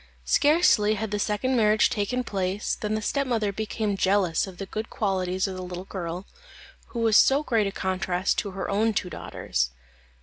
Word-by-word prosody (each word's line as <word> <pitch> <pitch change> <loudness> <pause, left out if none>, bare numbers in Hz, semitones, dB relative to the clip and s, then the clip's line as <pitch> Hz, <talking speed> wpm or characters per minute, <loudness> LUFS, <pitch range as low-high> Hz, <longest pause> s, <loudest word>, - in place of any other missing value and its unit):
Scarcely 260 - +4
had 215 0 -4
the 210 - -1
second 215 +6 0
marriage 215 -2 +4
taken 250 +5 -1
place, 195 -2 -2
than 215 0 -2
the 215 - -3
stepmother 235 -5 0
became 215 0 -2
jealous 190 -3 +2
of 185 -2 -10
the 195 - -5
good 215 +3 -5
qualities 185 -3 -1
of 190 - -5
the 185 - -6
little 180 0 -6
girl, 180 -1 -5 0.6
who 235 - -5
was 225 -2 +3
so 275 +6 +5
great 225 -7 +1
a - - -2
contrast 185 -1 -1
to 205 - -3
her 190 -1 -5
own 215 +2 +1
two 180 - -1
daughters. - - -2
205 Hz, 180 wpm, -26 LUFS, 185-220 Hz, 0.6 s, so